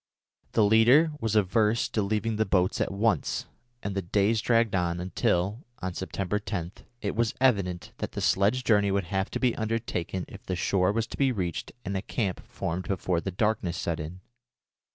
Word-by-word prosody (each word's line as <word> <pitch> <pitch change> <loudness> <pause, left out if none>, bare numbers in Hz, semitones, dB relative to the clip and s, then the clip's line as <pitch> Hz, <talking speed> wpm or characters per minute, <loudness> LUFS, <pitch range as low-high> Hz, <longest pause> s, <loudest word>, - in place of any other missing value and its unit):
The 110 - +4
leader 120 +9 +6
was 110 -4 -1
averse 105 +2 +3
to 110 - 0
leaving 110 +2 -1
the 110 - +3
boats 95 -2 +2
at - - 0
once, 105 +3 0 0.4
and 100 - -2
the 95 - -1
days 100 +5 +2
dragged 115 -1 +2
on 85 -2 0
until, 95 - 0
on 95 0 -4
September 95 +2 -2
10, 90 -5 -4 0.3
it - - -1
was 115 0 +1
evident 100 -9 +1
that - - -4
the - - -3
sledge 105 +7 +2
journey 105 -4 +3
would 100 0 +1
have 95 0 0
to - - -3
be 125 -3 +2
undertaken 110 -5 -2
if - - -11
the 95 - -3
shore 90 +1 +2
was 115 +2 0
to - - -9
be 135 -2 +3
reached 90 -8 -3
and 100 +1 -2
a 95 - 0
camp 100 -5 -2
formed 90 +2 -4
before 90 -2 0
the 95 - -3
darkness 95 -3 0
set 85 -1 -2
in. 80 +4 -7
100 Hz, 190 wpm, -28 LUFS, 90-110 Hz, 0.4 s, leader